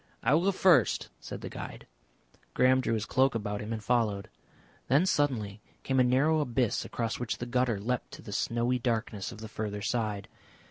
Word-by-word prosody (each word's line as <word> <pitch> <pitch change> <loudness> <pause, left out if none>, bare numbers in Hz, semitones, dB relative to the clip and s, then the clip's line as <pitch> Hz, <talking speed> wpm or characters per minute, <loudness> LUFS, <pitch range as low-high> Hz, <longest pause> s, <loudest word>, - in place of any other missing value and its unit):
"I 125 - +3
will 165 +4 +3
go 200 - +4
first," 175 - +3
said - - -7
the - - -5
guide. - - -8 0.7
Graham 130 +1 +4
drew 115 - 0
his 105 -2 -2
cloak 130 0 +2
about 105 -2 -2
him 105 +2 -6
and 110 -1 -4
followed. 105 -4 0 0.6
Then 140 +8 +4
suddenly 115 - 0 0.2
came 130 -1 +1
a - - +6
narrow 135 +6 +3
abyss 125 -5 0
across 115 -2 -3
which 120 -2 -2
the 120 - -4
gutter 125 -3 +1
leapt 125 +4 -2
to - - -10
the 105 - -8
snowy 120 +4 0
darkness 115 -4 -2
of 110 - -10
the 110 - -6
further 105 -1 -4
side. 105 -3 -1
120 Hz, 190 wpm, -30 LUFS, 110-130 Hz, 0.7 s, a